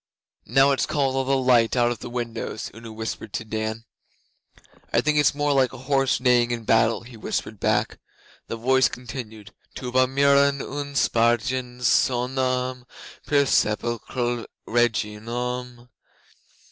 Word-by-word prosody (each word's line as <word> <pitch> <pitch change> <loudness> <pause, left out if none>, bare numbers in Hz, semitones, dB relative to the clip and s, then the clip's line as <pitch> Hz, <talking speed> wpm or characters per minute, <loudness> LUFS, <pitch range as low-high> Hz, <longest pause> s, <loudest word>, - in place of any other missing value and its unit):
'Now 135 +1 +4
it's 135 - 0
calling 135 -3 0
all 135 - +1
the 135 +1 +1
light 125 -3 +3
out 120 -1 +3
of 120 - -5
the - - -7
windows,' 115 -2 -5
Una 115 0 -10
whispered 110 -1 -6
to 115 - -3
Dan. 110 +1 -4 1.1
'I - - +3
think 150 0 +2
it's 145 - +3
more 145 0 +1
like 130 -2 +2
a - - -8
horse 135 +1 +1
neighing 125 -2 +3
in 120 -1 -3
battle,' 115 +1 +2
he 120 0 -13
whispered 110 - -4
back. - - 0 0.5
The - - -4
voice 130 +3 +3
continued: 110 -4 -8 0.2
'Tuba 130 0 +1
mirum 140 +1 +1
spargens 125 +1 +1
sonum 125 0 +1 0.4
Per 145 -1 +3
sepulchre 120 +1 -1 0.2
regionum. 120 +2 -2
125 Hz, 135 wpm, -24 LUFS, 115-130 Hz, 1.1 s, Now